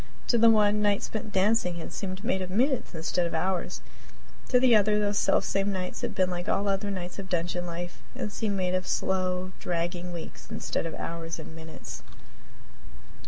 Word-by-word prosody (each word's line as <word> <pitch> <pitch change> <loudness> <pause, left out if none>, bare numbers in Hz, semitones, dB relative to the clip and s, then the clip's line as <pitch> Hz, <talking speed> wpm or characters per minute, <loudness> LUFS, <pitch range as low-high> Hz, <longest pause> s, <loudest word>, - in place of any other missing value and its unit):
To 240 - +5
the 230 +1 +8
one, 210 -1 +5
nights 205 -1 +2
spent 220 - -4
in - - -7
dancing 195 -2 +2
had 170 - -6
seemed 190 0 -4
made 205 -5 +1
of 185 - -3
minutes 250 - +1
instead 170 +2 0
of 165 - -4
hours; 180 +2 -1 0.7
to 250 - +5
the 250 -2 +6
other, 210 0 +5
those 205 -1 +1
selfsame 195 +1 +2
nights 185 -1 -3
had - - -3
been 185 -1 +2
like 175 0 -3
all 200 - +2
other 200 +1 0
nights 180 -1 -4
of 190 -1 -6
dungeon 175 0 -1
life 175 +1 -5
and 210 - -3
seemed 210 -3 -1
made 180 -1 0
of 185 0 0
slow, 185 -1 0
dragging 175 +1 -2
weeks 170 -2 -8
instead - - -2
of 160 - -5
hours 165 0 -4
and 160 0 -9
minutes. 160 0 -8
185 Hz, 190 wpm, -28 LUFS, 175-205 Hz, 0.7 s, the